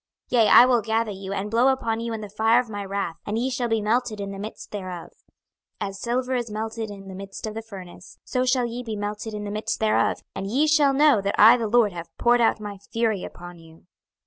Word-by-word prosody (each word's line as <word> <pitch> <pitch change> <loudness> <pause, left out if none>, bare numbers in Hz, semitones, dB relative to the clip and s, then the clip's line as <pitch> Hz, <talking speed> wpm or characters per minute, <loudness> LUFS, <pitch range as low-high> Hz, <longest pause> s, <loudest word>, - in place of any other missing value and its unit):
26:022:021 240 -2 +5
Yea, - - +3
I 245 - +9
will 245 -2 +3
gather 220 +1 0
you, 195 0 -7
and 200 +1 -3
blow 235 +3 +4
upon 230 -4 0
you 230 0 -4
in 220 -1 -4
the 210 - -7
fire 225 +3 +3
of 245 -3 -4
my 205 -1 -4
wrath, 195 -3 -3
and 210 +1 -3
ye 255 +3 -1
shall 245 -1 -1
be 225 -2 0
melted 225 0 0
in 200 0 -4
the 195 - -7
midst 215 +2 -8
therof. 185 -4 -6
26:022:022 - - -37 0.7
As 195 0 -4
silver 250 +2 -1
is 240 -2 -1
melted 220 +1 -4
in 195 -1 -10
the 190 - -8
midst 195 +2 -8
of 215 - -4
the 225 - -5
furnace, 190 -5 -12
so 255 - -1
shall 255 -1 +2
ye 235 +1 -4
be 225 -3 -5
melted 210 +1 -4
in 210 - -5
the 205 - -5
midst 215 +1 -3
thereof; 215 -1 +1
and 195 0 -5
ye 265 +9 +2
shall 300 -3 +4
know 285 -6 +5
that 200 +1 -1
I 225 +3 +8
the 230 -3 -2
LORD 225 -1 +3
have 170 -1 -7
poured 240 0 +3
out 225 - +3
my 205 -2 -7
fury 220 -1 -1
upon 175 0 -10
you. 165 0 -18
220 Hz, 250 wpm, -24 LUFS, 200-240 Hz, 0.7 s, I